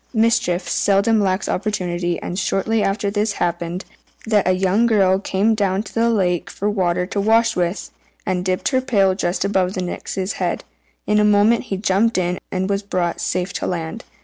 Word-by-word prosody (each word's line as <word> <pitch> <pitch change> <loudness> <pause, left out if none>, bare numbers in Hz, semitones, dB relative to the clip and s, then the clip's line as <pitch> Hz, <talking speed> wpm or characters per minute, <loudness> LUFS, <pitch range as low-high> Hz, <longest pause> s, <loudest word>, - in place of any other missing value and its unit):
Mischief 220 -6 +1
seldom 205 +3 +2
lacks 190 0 0
opportunity, 180 -4 -2
and 180 - -3
shortly 205 +3 0
after 200 0 0
this 210 +1 0
it - - -11
happened 175 +1 -2 0.4
that 210 -4 +2
a 185 - +4
young 190 +5 +2
girl 195 -4 +3
came 200 +3 +1
down 200 -2 0
to 205 - -12
the 230 +1 +2
lake 180 -4 0
for 200 - -3
water 180 -3 0
to 200 +2 -2
wash 225 +2 +3
with; 175 +1 -2 0.3
and 185 -2 -1
dipping 185 +5 -1
her 260 -1 +2
pail 195 -7 +3
just 185 0 -1
above 190 -1 0
the 185 - -2
Nix's 185 +2 -4
head, - - -1 0.4
in 210 0 +2
a - - +4
moment 210 +3 +3
he 195 - -3
jumped 205 +3 +1
in, 180 0 -1
and 185 0 -1
was 200 0 0
brought 180 -4 -2
safe 180 +1 -2
to - - -3
land. 170 +5 -4
195 Hz, 190 wpm, -20 LUFS, 180-210 Hz, 0.4 s, a